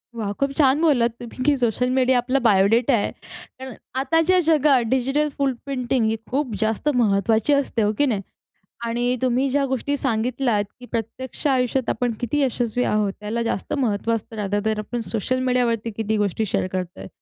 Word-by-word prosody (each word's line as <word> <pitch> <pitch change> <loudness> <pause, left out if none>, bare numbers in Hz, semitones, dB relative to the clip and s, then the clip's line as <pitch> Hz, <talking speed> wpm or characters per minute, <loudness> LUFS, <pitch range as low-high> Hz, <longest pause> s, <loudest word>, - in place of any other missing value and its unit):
वाह! 215 -3 -3
खूप 275 0 +1
छान 285 0 +4
बोललात 255 -8 +3
तुम्ही, 240 +1 -7
की 290 +2 +3
सोशल 245 0 0
मीडिया 260 -1 +3
आपला 255 +2 +1
बायोडेटा 225 +3 +3
आहे. 215 -4 +1 0.5
कारण 260 -1 -7 0.3
आताच्या 325 +6 +3
जगात 295 -4 +4
डिजिटल 270 +4 +1
फुटप्रिंटिंग 275 -2 +1 0.4
ही 225 -4 +2 0.2
खूप 265 -3 -1
जास्त 220 +6 0
महत्त्वाची 220 +2 +2
असते 280 -4 0
हो, 210 0 +2
की 290 - +3
नाही 220 -8 0 0.6
आणि 240 +2 0
तुम्ही 255 +2 +2
ज्या 280 +1 +1
गोष्टी 265 +2 -1
सांगितल्यात, 240 -3 0 0.2
की 250 - -10
प्रत्यक्ष 235 +5 -4
आयुष्यात 255 -2 +1
आपण 245 +1 0
किती 245 +5 -1
यशस्वी 245 -2 0
आहोत 210 -2 +1
त्याला 215 +3 -2
जास्त 230 -4 -3
महत्त्व 230 -3 0
असतं 225 +1 -6
रादर 205 -1 -1
दॅन 215 +1 -1
आपण 235 +3 -4
सोशल 235 +3 0
मीडियावरती 235 -3 +1
किती 220 -1 -1
गोष्टी 205 +1 0
शेअर 185 - -1
करत 180 -1 -4
आहे - - -8
240 Hz, 175 wpm, -22 LUFS, 220-265 Hz, 0.6 s, छान